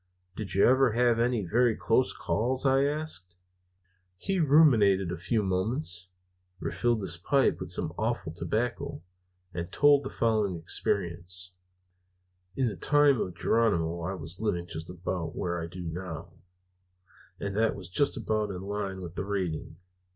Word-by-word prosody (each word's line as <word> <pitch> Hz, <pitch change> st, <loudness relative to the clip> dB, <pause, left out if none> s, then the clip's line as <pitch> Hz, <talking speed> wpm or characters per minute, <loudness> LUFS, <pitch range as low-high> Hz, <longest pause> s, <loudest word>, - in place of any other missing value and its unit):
"Did 105 Hz, -3 st, -3 dB
you 100 Hz, -, +5 dB
ever 130 Hz, -2 st, +4 dB
have 120 Hz, 0 st, +3 dB
any 120 Hz, -4 st, +1 dB
very 115 Hz, +5 st, +2 dB
close 125 Hz, +3 st, +2 dB
calls?" 130 Hz, +5 st, 0 dB
I 135 Hz, +1 st, +4 dB
asked. 145 Hz, -, -3 dB, 0.8 s
He 195 Hz, -, -1 dB
ruminated 115 Hz, -, +5 dB
a -, -, -2 dB
few 110 Hz, +1 st, 0 dB
moments, 95 Hz, -, -1 dB, 0.5 s
refilled 120 Hz, 0 st, 0 dB
his 85 Hz, -2 st, -1 dB
pipe 135 Hz, +10 st, +2 dB
with 95 Hz, -, -6 dB
some 80 Hz, -2 st, -1 dB
awful 110 Hz, -7 st, -1 dB
tobacco, 110 Hz, +4 st, -3 dB, 0.5 s
and 85 Hz, +1 st, -5 dB
told 145 Hz, -1 st, +5 dB
the 135 Hz, -, -4 dB
following 110 Hz, -5 st, +1 dB
experience: 90 Hz, +1 st, -1 dB, 1.0 s
"In 130 Hz, -2 st, +1 dB
the 105 Hz, -, -3 dB
time 145 Hz, -, +4 dB
of 90 Hz, -, -4 dB
Geronimo 85 Hz, -7 st, +1 dB
I 95 Hz, +4 st, -3 dB
was 85 Hz, +2 st, -6 dB
living 95 Hz, -6 st, -1 dB
just 80 Hz, -1 st, -6 dB
about 90 Hz, -2 st, -4 dB
where 85 Hz, -1 st, -2 dB
I 85 Hz, -, -4 dB
do 90 Hz, +2 st, -9 dB
now; 80 Hz, -1 st, -6 dB, 1.1 s
and 100 Hz, -1 st, -4 dB
that 110 Hz, +1 st, +2 dB
was 95 Hz, -2 st, -6 dB
just 140 Hz, +11 st, +1 dB
about 110 Hz, -1 st, -1 dB
in 95 Hz, -1 st, -6 dB
line 100 Hz, -1 st, -4 dB
with 85 Hz, -2 st, -7 dB
the 95 Hz, -, -3 dB
raiding. 90 Hz, -6 st, -3 dB
100 Hz, 150 wpm, -28 LUFS, 90-120 Hz, 1.1 s, you